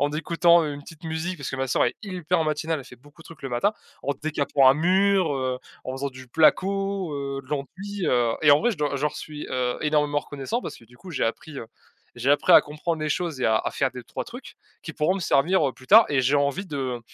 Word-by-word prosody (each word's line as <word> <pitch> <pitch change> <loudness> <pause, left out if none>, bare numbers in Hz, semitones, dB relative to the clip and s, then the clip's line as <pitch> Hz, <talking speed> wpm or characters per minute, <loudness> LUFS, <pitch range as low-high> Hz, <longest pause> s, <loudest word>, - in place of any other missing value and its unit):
en 145 0 +2
écoutant 170 +1 +3
une 145 -1 -5
petite 160 +3 -14
musique- 160 +3 -3
parce 140 - -6
que 130 - -4
ma 135 0 -1
sœur - - +2
est 120 - 0
hyper 180 -4 -1
matinale 155 +1 -1
elle 135 - -9
fait 125 - -13
beaucoup 145 +5 -20
de - - -14
trucs 160 -2 -14
le 135 - -5
matin, 120 - +1 0.3
en 140 - -1
décapant 145 -3 +2
un - - +3
mur, 185 0 +2
heu, 130 -1 -2 0.3
en 130 - -4
faisant 135 +2 -3
du 130 -1 -13
placo, 190 +4 +1
heu, 140 -1 -4
de 130 - -22
l'enduit, 185 +8 -4
heu 120 -2 +2
et 150 - +5
en 145 - +6
vrai 240 +3 +2
je 195 - -5
dois 145 -1 -1
je 135 - -5
leur 150 - 0
suis, 150 -1 -7
heu, 125 -1 -1
énormément 150 -1 +1
reconnaissant 145 - -4
parce - - -7
que 115 - -18
du 120 +1 -20
coup, 185 +5 -12
j'ai 155 - -1
appris, 140 +5 -4
heu, - - -7 0.5
j'ai 125 +3 0
appris 145 - +4
à - - +9
comprendre 155 +2 -4
les 155 - -1
choses 165 -3 -2
et - - +1
à 110 - +3
à - - -2
faire 135 -1 0
des 125 - -9
3 - - -6
trucs - - -11 0.3
qui - - -8
pourront 155 +4 +1
me 195 - -4
servir, 160 0 +2
heu, 130 - -7
plus 130 - -17
tard 220 +3 +8
et 135 -3 +1
j'ai 140 +3 +3
envie 140 +7 0
de, 150 -5 -5
heu, 125 -3 -3
150 Hz, 265 wpm, -24 LUFS, 135-170 Hz, 0.5 s, à